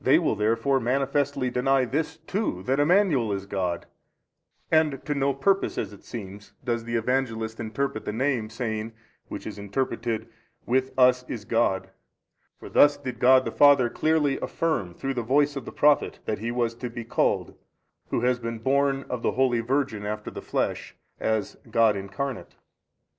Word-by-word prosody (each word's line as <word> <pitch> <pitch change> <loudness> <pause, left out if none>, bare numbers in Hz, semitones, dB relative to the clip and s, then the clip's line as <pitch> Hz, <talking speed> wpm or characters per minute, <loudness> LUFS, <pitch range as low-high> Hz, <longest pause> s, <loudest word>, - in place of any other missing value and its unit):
A. - - -23
They - - +6
will - - +1
therefore 115 +6 +1
manifestly 135 +1 0
deny 130 +1 +2
this 150 +6 -2
too, 160 - -3
that 135 +7 0
Emmanuel 150 - +3
is 100 -1 -3
God, 90 -3 -2 0.9
and 155 -4 +2
to 150 - 0
no 140 -1 +1
purpose 195 +9 +1
as 105 -2 -3
it 100 - -15
seems, 105 -2 -9
does 120 -2 -2
the 115 0 -3
Evangelist 115 -2 -1
interpret 115 +1 -3
the - - -2
name 120 -1 0
saying, 110 -1 -4 0.3
Which - - -7
is - - -6
interpreted, 115 +2 -2 0.4
With 130 +2 +1
us 125 -1 +5
is 105 -4 -5
God, 115 -5 0 0.7
for - - -11
thus 145 0 +5
did 125 -4 -6
God 130 +1 +6
the - - -2
Father 140 -4 +5
clearly 155 -3 +1
affirm 100 - -2
through 135 0 -3
the 125 - -2
voice 145 +5 +2
of 135 -4 -5
the - - -7
Prophet 150 0 +3
that 105 - -2
He 115 +2 -3
was 120 -1 0
to 125 0 -5
be 120 0 -6
called 115 - 0 0.5
Who - - -1
has 125 0 +2
been 115 -1 -4
born 135 +3 +1
of 125 -2 -4
the - - 0
holy 125 -2 +2
Virgin 125 -3 -1
after 105 +1 -4
the - - -7
flesh, - - -2 0.2
as 110 -2 -1
God 110 -1 +4
Incarnate. 100 +7 -5
125 Hz, 175 wpm, -26 LUFS, 110-135 Hz, 0.9 s, They